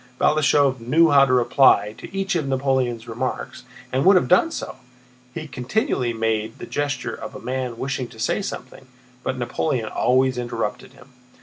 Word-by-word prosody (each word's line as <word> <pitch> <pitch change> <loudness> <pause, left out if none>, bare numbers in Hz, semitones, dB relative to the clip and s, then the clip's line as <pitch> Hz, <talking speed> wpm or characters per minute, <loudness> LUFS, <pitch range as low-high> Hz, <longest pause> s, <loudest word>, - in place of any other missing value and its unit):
Balashëv 140 -3 +3
knew 155 +8 +3
how 140 -1 +7
to 130 - 0
reply 120 -4 +4
to - - -10
each 195 0 -2
of 160 -5 -1
Napoleon's 130 -3 0
remarks, - - -4 0.3
and 130 +1 +1
would 195 +3 +6
have 180 - +3
done 185 - +4
so; 325 - -6 0.6
he 155 -1 -5
continually 125 - -1
made 110 -1 -2
the - - -8
gesture 145 -1 -3
of - - -8
a - - -7
man 125 -1 -4
wishing 130 0 -3
to 115 -1 -16
say 115 - -1
something, 135 -8 -7 0.3
but 130 - -3
Napoleon 120 -1 -2
always 130 0 +2
interrupted 115 -3 -4
him. 125 - -18
130 Hz, 170 wpm, -22 LUFS, 120-145 Hz, 0.6 s, how